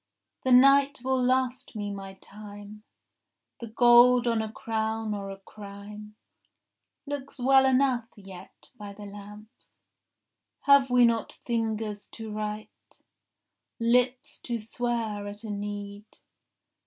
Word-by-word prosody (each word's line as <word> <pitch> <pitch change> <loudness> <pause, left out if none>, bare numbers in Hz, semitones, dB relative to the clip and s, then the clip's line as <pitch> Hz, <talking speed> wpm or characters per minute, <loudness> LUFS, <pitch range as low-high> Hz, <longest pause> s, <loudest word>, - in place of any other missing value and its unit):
— - - -51
The 260 - +1
night 275 +2 +5
will 260 0 +1
last 255 -1 0
me 205 -1 -4
my 195 -1 -8
time. 205 +1 -12 0.8
The 235 - -7
gold 240 +2 +6
on 230 -1 +1
a 220 -1 -5
crown 220 -3 -3
or 200 -1 -5
a 195 - -7
crime 210 +1 -11 0.9
Looks 285 -1 -6
well 265 +1 +4
enough 255 -3 +2
yet 190 -3 -14
by 205 -3 -9
the 205 +1 -11
lamps. 205 +2 -13 0.9
Have 280 -2 +5
we 245 -1 +5
not 230 -1 0
fingers 220 -3 -3
to 220 -1 -8
write, 210 0 -7 0.8
Lips 245 +2 +1
to 235 -2 -4
swear 225 -2 -3
at 205 +1 -9
a 220 - -5
need? 205 0 -6
220 Hz, 125 wpm, -27 LUFS, 205-250 Hz, 0.9 s, gold